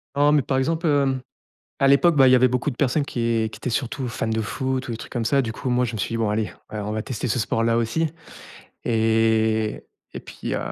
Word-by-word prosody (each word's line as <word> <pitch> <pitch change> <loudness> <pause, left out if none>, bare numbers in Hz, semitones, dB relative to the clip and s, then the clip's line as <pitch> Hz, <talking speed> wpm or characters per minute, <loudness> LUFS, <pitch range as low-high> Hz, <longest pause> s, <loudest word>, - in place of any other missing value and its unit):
Oh, 145 +1 +4
mais, 150 -1 +4
par 130 0 -1
exemple, 165 +5 0
heu, 140 -3 +2 0.6
à 135 - +4
l'époque, 150 +4 +5
bah, 135 -1 +7
il 130 - +6
y - - +7
avait 130 0 +5
beaucoup 125 +4 -1
de 125 - -9
personnes 140 +1 +1
qui 115 -3 -1
qui - - -8
étaient 125 - -3
surtout 125 +1 -2
fan 110 -1 -3
de 110 0 0
foot 130 +3 -3
ou - - -3
des 115 - -3
trucs - - -10
comme 120 -2 -2
ça, 140 +4 +3
du 115 -2 -4
coup 130 - -5
moi 125 0 +2
je 120 - -3
me 110 - -4
suis - - -1
dit: - - 0
«Bon, 110 -2 0
allez, 105 0 -1 0.2
ouais, 105 - -4
on 105 +1 -4
va 110 0 -2
tester 125 0 -4
ce 125 - 0
sport 115 +1 0
là 115 0 +2
aussi». 140 +8 0 0.8
Et 110 -1 +1 0.3
et - - -5
puis, - - -6
heu, - - 0
120 Hz, 265 wpm, -23 LUFS, 110-135 Hz, 0.8 s, bah